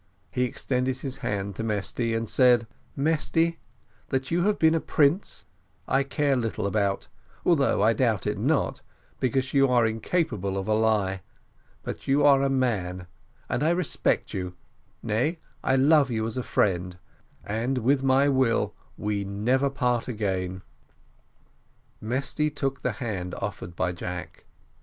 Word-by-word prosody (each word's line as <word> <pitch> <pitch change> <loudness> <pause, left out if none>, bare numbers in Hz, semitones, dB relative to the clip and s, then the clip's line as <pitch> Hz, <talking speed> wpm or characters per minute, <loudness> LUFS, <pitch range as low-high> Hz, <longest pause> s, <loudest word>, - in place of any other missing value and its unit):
He 125 - +1
extended 125 +1 -1
his 135 -1 -5
hand 100 -1 -3
to 115 - -3
Mesty, 115 +2 -1
and 115 0 -2
said: 120 0 +4 0.3
"Mesty 165 +3 +1 0.5
that 130 +2 -1
you 175 +1 +2
have 210 0 +2
been 160 0 +4
a 165 - +2
prince, 155 +5 +1 0.4
I 135 - +3
care 140 0 +1
little 115 -7 -2
about, 100 -1 0 0.4
although - - +3
I - - +5
doubt - - +1
it - - -1
not, - - 0 0.4
because 130 +1 0
you 135 -1 +5
are 120 -2 +3
incapable 110 - -1
of 95 - -3
a 110 - +2
lie; 105 -4 +1 0.6
but - - -6
you 140 +2 +3
are 140 -2 +6
a 140 - +2
man, 100 -9 -1 0.4
and - - -1
I 155 - +3
respect 175 -1 0
you, 90 -1 -4 0.5
nay, 120 +10 0 0.3
I - - +2
love 140 +1 +5
you 110 -2 -1
as 115 - -4
a 130 - -1
friend 90 -6 0 0.5
and 115 +6 -1
with 130 +3 +2
my 135 +1 +4
will 130 -4 +2 0.2
we 105 -1 -1
never 120 +8 +1
part 125 -3 0
again." 95 -5 -2 1.4
Mesty 140 +6 0
took 135 -2 -3
the 125 - -1
hand 100 -5 -4
offered 95 -3 -5
by 90 +1 0
Jack. 90 0 -7
125 Hz, 150 wpm, -26 LUFS, 100-135 Hz, 1.4 s, are